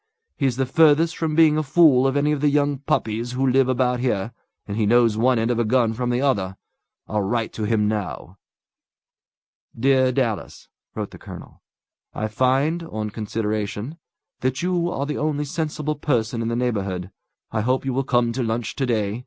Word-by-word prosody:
He's 135 -4 0
the 135 +1 0
furthest 160 +4 +4
from 160 -2 -2
being 155 -1 +5
a - - +2
fool 135 -3 +4
of 135 +1 0
any 145 +1 +2
of 150 -2 -1
the 150 - +4
young 145 -1 +1
puppies 115 -3 -1
who 130 +2 0
live 130 0 +3
about 125 -1 +1
here, 115 -4 -1 0.4
and 100 - -4
he 110 -1 +1
knows 115 -1 +4
one 125 +3 +2
end 115 +2 +1
of 120 - 0
a - - +3
gun 115 0 +2
from 125 +2 -2
the 125 +1 0
other. 100 -9 0 0.5
I'll 105 -1 -1
write 115 +3 -1
to 110 - -3
him 105 -1 +1
now." 100 -3 -4 1.4
"Dear 130 0 +3
Dallas" 120 -5 -3 0.3
(wrote - - -4
the - - -12
colonel), - - -11 0.5
"I 110 0 -2
find, 135 +9 +1
on 110 -10 -5
consideration, 110 +5 -3 0.4
that 130 +4 -1
you 175 -1 0
are 140 -5 -2
the 150 0 -3
only 150 -1 -1
sensible 155 0 -2
person 120 -6 -1
in 115 - -2
the 115 - -1
neighbourhood. 100 -7 -2 0.4
I 110 - -1
hope 130 +4 0
you 135 - -1
will 135 +2 0
come 120 -2 +1
to 130 +3 -3
lunch 115 -1 -2
to 135 - 0
day. 110 -2 -1
125 Hz, 190 wpm, -22 LUFS, 110-140 Hz, 1.4 s, being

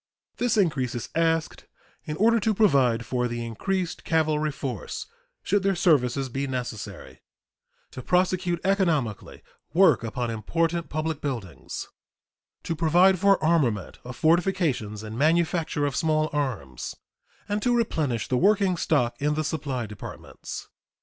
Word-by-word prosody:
This 240 -2 +1
increase 140 - +1
is 120 - -5
asked 165 -1 0 0.4
in 150 0 -4
order 230 +2 +4
to 215 +1 +1
provide 130 - +3
for 125 -1 0
the 120 0 -4
increased 180 - -3
cavalry 155 -2 +1
force 130 -7 -5 0.4
(should 205 +1 +2
their 195 0 +1
services 135 -6 +2
be 135 +3 -3
necessary), 125 -5 -6 0.7
to 130 - -7
prosecute 180 +2 +1
economically 165 - 0 0.3
work 190 -8 +5
upon 120 +1 -2
important 165 +10 -1
public 155 0 -2
buildings, 105 - -5 0.8
to 165 - -2
provide 175 +4 +4
for 200 0 +5
armament 135 - +1
of 125 0 -8
fortifications 160 - +1
and 110 +2 -6
manufacture 160 -1 +1
of 140 -2 -2
small 155 -1 +1
arms, 105 - -3 0.5
and 205 +1 -1
to 245 +1 +2
replenish 150 - 0
the 125 - +1
working 195 +1 +3
stock 125 -8 +1
in 150 +1 +1
the 155 - 0
supply 140 -6 -3
departments. 105 -2 -8
155 Hz, 135 wpm, -26 LUFS, 125-175 Hz, 0.8 s, work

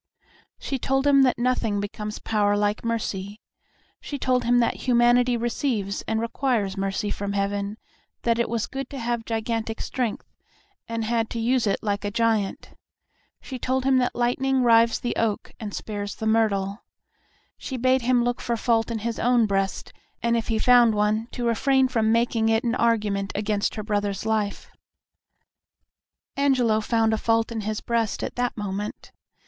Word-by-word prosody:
She 270 - -4
told 270 +2 0
him 280 -1 +6
that 255 -2 +3
nothing 240 -4 0
becomes 210 +1 -5
power 205 -2 +1
like 205 +1 0
mercy. 210 -3 -3 0.6
She 285 - -6
told 255 -2 +1
him 245 +1 +4
that 235 -1 +2
humanity 240 0 +4
receives 230 -4 -2
and 220 0 0
requires 230 -4 -1
mercy 195 +1 -2
from 200 0 -3
Heaven, 200 +1 -2 0.5
that 230 0 +1
it 235 - +1
was 230 -2 -1
good 270 -1 -6
to 280 - -7
have 235 -2 -2
gigantic 225 0 -2
strength, 245 -4 -3 0.6
and 230 -1 -3
had 225 0 0
to 230 - -4
use 240 0 +1
it 200 - 0
like 205 -1 -1
a 205 - -1
giant. 220 -2 0 0.7
She 260 -2 -7
told 260 +2 0
him 265 -1 +4
that 250 - 0
lightning 255 +2 +1
rives 230 -1 +4
the 240 - -3
oak 220 -3 -1
and 215 -3 -5
spares 205 -1 -5
the 220 - -5
myrtle. 210 -2 +1 0.8
She 260 - -5
bade 255 +1 +2
him 245 0 +2
look 245 0 -1
for 235 -1 -1
fault 225 0 +1
in 230 - -2
his 235 -1 -2
own 240 -1 +3
breast, 195 -2 -2 0.3
and 235 0 +2
if 230 -1 -1
he 225 - 0
found 240 -1 +5
one, 210 +2 +1
to 240 - -3
refrain 265 +3 +3
from 225 -4 +1
making 230 -1 +2
it 225 0 +2
an 235 -1 0
argument 210 -5 +1
against 210 0 -1
her 215 - -4
brother's 205 -1 -2
life. 215 -2 -2 1.6
Angelo 255 -6 +2
found 225 0 +1
a 220 - 0
fault 225 0 +1
in 225 -1 -3
his 215 +1 -3
breast 230 -3 -1
at - - -4
that 245 -1 -1
moment. 205 0 -5
225 Hz, 170 wpm, -24 LUFS, 210-245 Hz, 1.6 s, him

